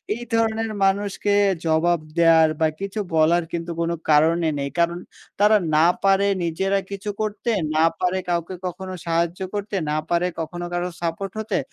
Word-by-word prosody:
এই 240 - -7
ধরনের 225 0 0
মানুষকে 200 +1 +1 0.3
জবাব 165 +2 +2 0.2
দেওয়ার 165 -1 +6
বা 160 - +5
কিছু 200 +2 -4 0.2
বলার 165 +2 +4
কিন্তু 170 0 -4
কোনো 170 0 0
কারণই 160 +2 +4
নেই। 140 0 -2
কারণ, 170 0 +2 0.4
তারা 210 +1 +6 0.2
না 155 +2 +5 0.2
পারে 195 0 +4 0.2
নিজেরা 190 +4 0
কিছু 200 +1 -5
করতে, 215 +2 -3 0.3
না 155 - +4 0.2
পারে 180 +1 0
কাউকে 175 +1 -2
কখনো 185 +1 -5
সাহায্য 170 +1 0
করতে, 205 0 -4 0.2
না 150 - 0
পারে 175 +1 +2
কখনো 175 +2 -4
কারোর 175 0 -2
সাপোর্ট 175 +3 -3
হতে। 220 -2 -1
175 Hz, 160 wpm, -22 LUFS, 165-200 Hz, 0.4 s, দেওয়ার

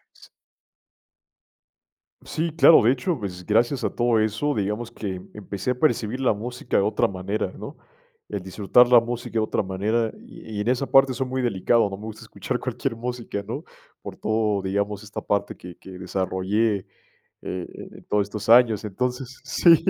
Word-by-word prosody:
S - - -18 2.0
Sí, 165 +1 -2
claro, 165 +1 +7
de 115 - +5
hecho, 135 +4 -1
pues, 90 -4 -6
gracias 120 +5 +2
a - - 0
todo 120 -2 +2
eso, 110 +7 0
digamos 105 +3 -2
que 95 -5 -5
empecé 105 +3 -3
a - - -1
percibir 125 -5 +1
la 130 -4 +3
música 120 +4 -5
de - - +4
otra 105 - +2
manera, 95 +1 -3
¿no?, - - -8 0.5
el 100 -2 -3
disfrutar 100 +6 +4
la 120 -1 +8
música 120 +1 -5
de 115 - +2
otra 110 - 0
manera 105 +4 0
y 110 -2 -10
y - - -2
en 105 - -3
esa 130 +2 +1
parte 135 -1 +6
soy 130 +1 -2
muy 130 +1 -2
delicado, 115 0 +2
no 95 - -5
me 105 - -11
gusta 110 -1 -8
escuchar - - -4
cualquier 115 - -3
música, 120 -3 -4
¿no?, 135 +8 -4 0.4
por - - -8
todo 105 -3 0
digamos, 100 +1 -2
esta 105 0 -6
parte 100 -1 -1
que 90 -1 -11
que 95 - -12
desarrollé, 95 +3 0
eh - - -17 0.6
eh, 90 -1 -4 0.3
en - - -13
todo 105 - +1
estos 105 +1 -5
años. 115 -3 +6
Entonces 125 +5 -3
sí, 170 -2 +6
110 Hz, 180 wpm, -24 LUFS, 100-125 Hz, 2.0 s, la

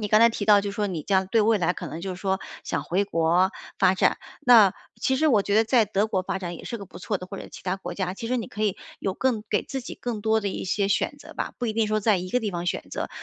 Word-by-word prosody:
你 210 - -2
刚 215 +1 +5
才 230 - +8
提 220 -2 -3
到 205 -1 +6
就 200 0 -4
说 205 0 -1
你 170 -5 -4
将 190 -1 +1
对 225 - +3
未 220 0 +3
来 175 -1 +1
可 - - -7
能 160 - -6
就 190 +2 -4
是 180 - -11
说 190 -1 0 0.2
想 - - -2
回 195 +4 0
国 175 +1 +2 0.3
发 185 0 +4
展， 185 - +2 0.2
那 225 -6 +7 0.3
其 265 - +2
实 310 +2 +3
我 215 -7 +4
觉 205 - -1
得 220 - +5
在 230 0 +4
德 205 +1 0
国 190 -3 0
发 190 - -3
展 175 -2 -5
也 - - -11
是 235 - -4
个 200 - -7
不 - - -12
错 200 0 -2
的， 185 - -8
或 195 +1 -7
者 - - -8
其 - - -11
它 185 0 -1
国 195 - -7
家， 185 -2 -2
其 230 - -6
实 255 - +1
你 230 - -3
可 215 - -3
以 205 -3 0 0.2
有 190 - -2
更 235 -3 0
给 205 - +1
自 270 - -5
己 - - -8
更 235 -3 -4
多 220 +1 +2
的 200 - -2
一 - - -4
些 195 +2 0
选 200 - 0
择 - - -12
吧， - - -3
不 245 - -2
一 220 - -1
定 225 -1 +1
说 215 0 0
在 210 -1 +3
一 185 +1 -5
个 250 - +2
地 215 -3 -2
方 175 -1 -4
选 - - -1
择。 - - -3
205 Hz, 335 characters per minute, -25 LUFS, 185-220 Hz, 0.3 s, 才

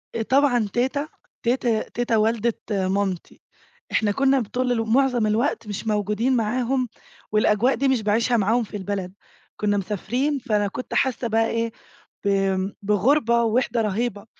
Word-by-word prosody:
آآ 230 - -1
طبعًا 245 -2 +2
تيتة 265 +5 0 0.4
تيت 245 +1 0 0.3
تيتة 240 -2 +1
والدة 225 +1 +1 0.2
مامتي. 190 -2 -2 0.5
إحنا 210 -2 +2
كنا 270 +3 +3
بطول 245 +3 -1
ال 225 -2 -1
معظم 250 -5 +3
الوقت 225 0 0
مش 210 +2 -5
موجودين 210 +4 +1
معاهم 245 +2 0 0.4
والأجواء 215 +4 +3
دي 275 +3 0
مش 260 -4 +2
باعيشها 230 +3 +2
معاهم 225 +4 +2
في 210 0 -7
البلد، 190 -1 -4 0.4
كنا 205 -1 +1
مسافرين 245 +9 -1
فأنا 210 -5 0
كنت 250 +6 -6
حاسة 255 -2 +1
بقى 225 0 +2
إيه 230 0 -1 0.5
ب - - +1 0.5
بغربة 235 +4 +2
ووحِدة 235 0 +1
رهيبة، 215 0 -2
230 Hz, 140 wpm, -23 LUFS, 210-250 Hz, 0.5 s, كنا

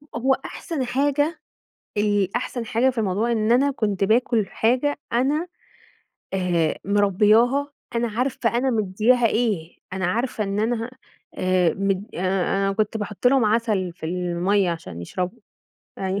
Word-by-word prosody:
هو 260 +3 +2
أحسن 310 -8 -4
حاجة 290 +5 0 0.6
ال 205 -2 +1
أحسن 240 -2 -3
حاجة 240 +4 +2
في 250 - -7
الموضوع 215 +3 0
إن 220 0 +2
أنا 275 +4 +4
كنت 205 -6 -1
باكل 225 -1 +2
حاجة 255 +9 +1
أنا 285 +8 +1 0.9
آآ، 175 -4 +1
مربّياها، 215 +8 +3 0.2
أنا 235 0 +1
عارفة 240 +1 -1
أنا 265 +1 +1
مدياها 225 +3 +2
إيه، 210 -8 -1 0.2
أنا 190 -1 -1
عارفة 225 +2 -1
إن 200 +1 -2
أنا 230 +1 -1 0.4
آآ، 185 -2 +2
مد 195 +1 -1
أنا 195 +2 0
كنت 215 +2 -1
باحط 210 +2 -3
لهم 260 -2 +5
عسل 210 -5 +1
في 160 - -7
المَيّة 180 +2 0
عشان 165 - -6
يشربوا، 180 - -4 0.6
أيوه، 190 +1 -1
215 Hz, 135 wpm, -23 LUFS, 190-245 Hz, 0.9 s, لهم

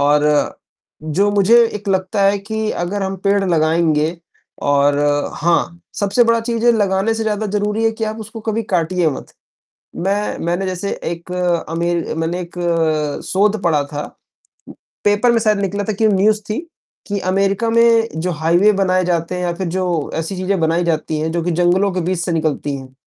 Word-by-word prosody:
और 145 +1 +3 1.0
जो 205 +1 +4
मुझे 205 +3 +4 0.2
एक 205 0 -6
लगता 190 +1 0
है 200 +1 +3
कि 220 +2 -3
अगर 200 +3 -3
हम 195 0 -2
पेड़ 200 0 +2
लगाएँगे 160 -1 +1 0.5
और 145 0 +3 0.4
हाँ, 170 0 0
सबसे 205 +4 +2
बड़ा 230 0 +3
चीज़ 230 0 -2
है 240 - +7
लगाने 205 0 +1
से 225 - -2
ज़्यादा 215 0 -1
ज़रूरी 210 +2 -1
है 225 - +4
कि 225 0 -3
आप 215 +1 -4
उसको 220 +1 -8
कभी 225 +1 0
काटिए 175 0 +1
मत। 135 - -8 0.6
मैं 200 +4 -1
मैंने 175 +3 -1
जैसे 185 +1 -3
एक 170 +1 -5 0.4
अमेर 170 +1 -1
मैंने 165 +2 -2
एक 175 0 -10 0.7
शोध 205 +2 +1
पढ़ा 155 -4 +2
था, 145 +1 -5 1.0
पेपर 205 +4 +3
में 230 - +3
शायद 215 -2 +2
निकला 200 +1 -2
था 215 - +1
कि 220 +2 +2
न्यूज़ 210 +1 +3
थी 215 - -1 0.5
कि 200 -1 -2
अमेरिका 195 +3 +1
में 230 0 +4
जो 180 +1 -1
हाईवे 175 +6 +4
बनाए 185 -1 +2
जाते 170 0 -1
हैं 180 - -3
या 175 - -1
फ़िर 185 +1 -4
जो 175 -4 -1
ऐसी 165 +4 -3
चीज़ें 185 0 -1
बनाई 165 +2 +1
जाती 155 -1 -1
हैं 160 +1 -1
जो 170 -1 -1
कि 175 - -1
जंगलों 180 +4 +2
के 180 - -1
बीच 180 +1 -1
से 175 0 -2
निकलती 155 -3 -1
हैं, 130 -1 -12
190 Hz, 180 wpm, -18 LUFS, 170-210 Hz, 1.0 s, है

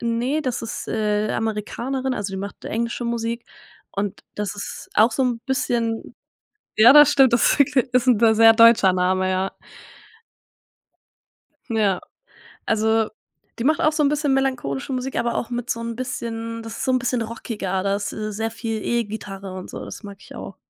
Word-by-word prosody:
N 230 -1 -1
ne, 270 +6 0
das 255 -6 -3
ist, 230 - -6
äh, 210 -1 0
Amerikanerin, 240 +5 -2
also, 205 -3 -4
die 190 - -4
macht 200 +1 -7
englische 235 +2 -3
Musik 235 0 -3 0.5
und 200 0 -4
das 210 -1 -3
ist 205 - -7
auch 225 +2 +5
so 270 - 0
'n 240 -2 -1
bisschen 235 -3 -1 0.6
Ja, 230 +4 +8
das 295 0 +8
stimmt, 265 -4 +5
das 235 - +4
ist - - -1
wirklich 270 -1 +3
ist 250 0 +2
'n 245 -4 +5
d 225 -1 +5
sehr 225 +1 +7
deutscher 230 -4 +6
Name, 185 +1 +1
ja. 185 +1 -1 2.2
Ja. 205 -5 +1 0.6
Also, 220 0 +1 0.5
die 230 - -3
macht 305 +2 +2
auch 310 - +3
so 305 - +1
'n 285 - +4
bisschen 290 -2 +1
melancholische 260 - -1
Musik, 255 +1 -3
aber 235 - 0
auch 240 - -3
mit 240 0 -4
so 230 - -1
'n 230 0 -5
bisschen 230 -3 -5
das 225 0 -8
ist - - -2
so 260 - +1
'n 255 - +3
bisschen 245 -1 -1
rockiger, 215 -4 -4
da 200 0 0
ist, 205 - -4
äh, 215 -1 -4
sehr 225 +2 -2
viel 225 -1 -4
E-Gitarre 205 -4 -3
und 185 - -8
so, - - -7
das - - -9
mag 200 -2 -10
ich - - -14
auch. 195 - -8
230 Hz, 190 wpm, -22 LUFS, 210-250 Hz, 2.2 s, Ja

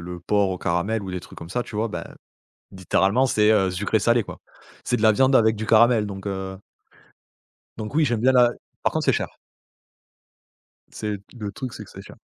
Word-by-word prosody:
le 90 0 -7
porc 100 +1 +1
au 90 - -4
caramel 95 +6 -1
ou 95 - -6
des 90 -1 -4
trucs - - -13
comme 85 - -9
ça, 120 +6 -2
tu 105 - -9
vois? 110 +2 0
Ben, 85 -4 -5 0.7
littéralement, 95 +6 +1
c'est, 105 -2 +3
heu, 95 -3 +3
sucré 105 +4 0
salé, 115 +2 +2
quoi. - - -10 0.4
C'est 120 - 0
de 110 - -3
la 110 - +7
viande 130 +4 +3
avec 110 -1 +4
du 110 - -4
caramel, 115 -1 +4
donc 95 -1 -8
heu 95 -1 -4 1.2
donc 110 +4 -6
oui, 160 - +3
j'aime 120 -5 0
bien 130 +2 +4
la 125 -2 +5 0.3
par - - +1
contre, - - -2
c'est - - +5
cher. - - -3 1.5
C'est 105 -1 -4
d - - -23 0.2
le 105 -2 -4
truc, 130 +2 -6
c'est - - -8
que - - -17
c'est - - -11
cher. - - -14
105 Hz, 215 wpm, -23 LUFS, 95-115 Hz, 1.5 s, la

